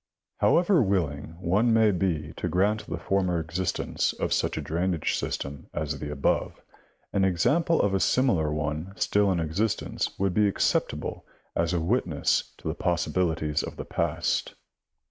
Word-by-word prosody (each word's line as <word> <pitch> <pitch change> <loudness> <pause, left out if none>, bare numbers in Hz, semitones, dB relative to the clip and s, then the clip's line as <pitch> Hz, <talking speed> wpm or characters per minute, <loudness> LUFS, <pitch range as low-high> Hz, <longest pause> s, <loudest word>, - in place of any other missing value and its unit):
— - - -61
However 175 -1 +4
willing 85 - -1
one 100 +7 +2
may 110 -2 +5
be 85 -5 -1
to - - -2
grant 105 +4 +1
the 85 - -3
former 90 0 0
existence 85 +2 -1
of - - -1
such - - 0
a - - -1
drainage 85 0 -1
system 70 0 -4
as 75 -1 -2
the 75 -1 -5
above, 70 -2 0 0.5
an 100 - +2
example 145 - +2
of 100 - +2
a 95 - +2
similar 85 - +2
one 75 +4 -3
still 100 -1 +2
in 90 - +1
existence 90 +7 -1
would 95 -1 0
be 105 +1 +4
acceptable 100 - -1 0.3
as 85 0 +1
a 90 - +1
witness 85 - 0
to - - -8
the - - 0
possibilities 85 -3 0
of - - -7
the - - -5
past. - - -1
90 Hz, 160 wpm, -27 LUFS, 80-100 Hz, 0.5 s, may